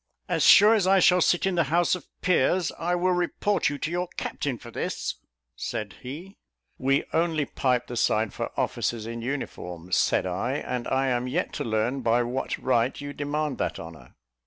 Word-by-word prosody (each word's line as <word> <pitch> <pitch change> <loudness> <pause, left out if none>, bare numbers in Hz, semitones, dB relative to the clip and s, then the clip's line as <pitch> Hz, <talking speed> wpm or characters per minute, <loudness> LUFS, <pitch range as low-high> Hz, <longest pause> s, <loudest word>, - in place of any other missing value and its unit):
"As - - 0
sure 210 +2 +8
as 205 -5 +2
I 195 +1 +5
shall 180 -1 +5
sit 175 +2 +3
in 190 - +1
the 170 -3 +2
House 170 +5 +2
of 180 - -4
Peers, 180 0 +2
I 175 +2 0
will 180 +1 +1
report 180 +2 +1
you 145 - -4
to 155 +3 -3
your 175 +1 -1
captain 135 -4 -3
for 120 -1 -12
this," - - -3 0.4
said 100 - -5
he. 160 +10 -9 0.4
"We 135 +2 +2
only 160 -3 +1
pipe 125 -2 0
the 120 - -7
side 110 -2 +1
for - - -3
officers 115 -2 -1
in 115 +1 -5
uniform," 90 -9 -5
said - - +2
I; 95 +8 -2
"and 125 -3 -3
I 135 0 +1
am 125 0 0
yet 125 - -2
to - - -3
learn 115 +4 -1
by 120 0 +2
what 125 +3 -3
right 125 0 +1
you 145 0 -6
demand 145 0 -2
that - - -2
honour." 80 -1 -11
135 Hz, 190 wpm, -26 LUFS, 120-175 Hz, 0.4 s, sure